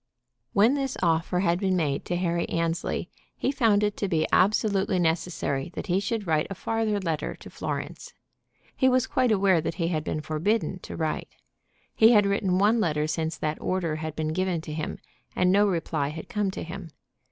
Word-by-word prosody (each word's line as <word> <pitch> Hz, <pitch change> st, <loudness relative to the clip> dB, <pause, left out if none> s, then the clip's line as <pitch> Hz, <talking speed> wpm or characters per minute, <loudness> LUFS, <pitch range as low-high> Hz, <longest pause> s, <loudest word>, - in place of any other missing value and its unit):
When 220 Hz, +4 st, +5 dB
this 275 Hz, -2 st, -2 dB
offer 165 Hz, +1 st, +1 dB
had 175 Hz, -2 st, +2 dB
been 190 Hz, -2 st, +1 dB
made 145 Hz, -5 st, -1 dB
to 175 Hz, -, -2 dB
Harry 175 Hz, -1 st, -1 dB
Annesley 165 Hz, 0 st, -1 dB, 0.3 s
he -, -, 0 dB
found 225 Hz, -7 st, +3 dB
it 210 Hz, 0 st, 0 dB
to 200 Hz, -, -1 dB
be 160 Hz, -4 st, +1 dB
absolutely 200 Hz, -1 st, +3 dB
necessary 165 Hz, -3 st, -1 dB
that -, -, -4 dB
he 185 Hz, -1 st, +1 dB
should 215 Hz, +1 st, -2 dB
write 155 Hz, -3 st, +1 dB
a 195 Hz, -, -5 dB
farther 220 Hz, +1 st, -1 dB
letter 165 Hz, -5 st, -2 dB
to -, -, -13 dB
Florence. -, -, -5 dB, 0.6 s
He 260 Hz, -, +4 dB
was 255 Hz, -1 st, +3 dB
quite 255 Hz, -3 st, +1 dB
aware 195 Hz, -5 st, +3 dB
that 165 Hz, -, -3 dB
he 165 Hz, -2 st, -1 dB
had 155 Hz, -3 st, -1 dB
been 155 Hz, -, -3 dB
forbidden 180 Hz, +6 st, -1 dB
to -, -, -8 dB
write. 160 Hz, -2 st, -3 dB, 0.6 s
He 225 Hz, +2 st, +6 dB
had 205 Hz, -2 st, +5 dB
written 200 Hz, -2 st, +1 dB
one 210 Hz, +4 st, +4 dB
letter 150 Hz, -6 st, +1 dB
since 160 Hz, 0 st, -2 dB
that 150 Hz, +2 st, -3 dB
order 170 Hz, -4 st, -1 dB
had 155 Hz, -1 st, -5 dB
been 155 Hz, -1 st, -2 dB
given 185 Hz, -1 st, 0 dB
to 155 Hz, -2 st, -7 dB
him, 155 Hz, 0 st, -4 dB, 0.4 s
and 180 Hz, 0 st, +3 dB
no 205 Hz, +2 st, +4 dB
reply 165 Hz, -5 st, -1 dB
had 155 Hz, +2 st, -7 dB
come 210 Hz, -4 st, 0 dB
to 190 Hz, -, -5 dB
him. 175 Hz, +1 st, -7 dB
180 Hz, 195 wpm, -26 LUFS, 160-205 Hz, 0.6 s, He